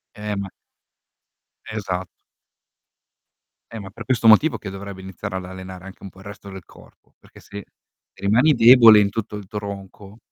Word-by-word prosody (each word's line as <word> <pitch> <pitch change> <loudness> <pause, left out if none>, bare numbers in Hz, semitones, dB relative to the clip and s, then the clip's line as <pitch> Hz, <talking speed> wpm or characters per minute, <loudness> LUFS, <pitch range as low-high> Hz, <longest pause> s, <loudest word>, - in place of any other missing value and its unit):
Eh 105 -1 -5
ma 100 -1 -5 1.2
Esatto. 95 -4 -6 1.5
E 115 - -6
ma 100 -2 -9
per 115 +4 -11
questo 115 -2 0
motivo 115 +8 +5
che 100 - -8
dovrebbe 100 0 -9
iniziare 95 +1 -7
ad 95 - -7
allenare 95 0 -10
anche 95 - -13
un 100 - -8
po' 95 - -20
il - - -15
resto 100 0 -11
del 95 -2 -11
corpo, - - -21
perché - - -20
se 100 0 -10 0.6
rimani 120 +10 +3
debole 115 -3 +7
in 100 -1 +2
tutto 105 0 -5
il 100 -2 -11
tronco 100 0 -9
100 Hz, 165 wpm, -21 LUFS, 95-110 Hz, 1.5 s, debole